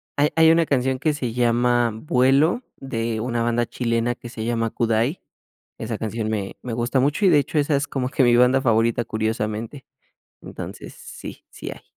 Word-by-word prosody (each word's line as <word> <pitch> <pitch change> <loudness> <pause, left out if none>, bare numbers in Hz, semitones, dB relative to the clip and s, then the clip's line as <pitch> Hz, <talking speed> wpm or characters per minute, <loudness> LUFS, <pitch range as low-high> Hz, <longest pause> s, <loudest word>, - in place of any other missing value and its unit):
hay 145 +1 +3
hay 160 0 +6
una 165 0 +3
canción 130 -2 0
que 155 +2 +1
se 125 -6 -3
llama 120 0 +2
"Vuelo", 140 - +2
de 115 -4 -3
una 120 +1 -2
banda 120 0 +1
chilena 115 0 -1
que 120 - -10
se 110 -1 -6
llama 115 -1 0
Kudai. 115 +8 0 0.6
Esa 110 -1 -4
canción 110 0 -3
me 100 -3 -3
me 125 - -5
gusta 120 +3 0
mucho 145 +9 +1
y - - +7
de 155 - +5
hecho, 145 +2 -1
esa 145 0 +2
es 140 +1 -1
como 130 -3 -2
que 135 - +1
mi 120 -1 +4
banda 125 +2 +4
favorita, 115 -1 +2
curiosamente. 110 +4 -3 0.6
Entonces, - - -8
sí. 480 +1 -10
Sí - - -8
hay. - - -11
120 Hz, 185 wpm, -22 LUFS, 115-140 Hz, 0.6 s, y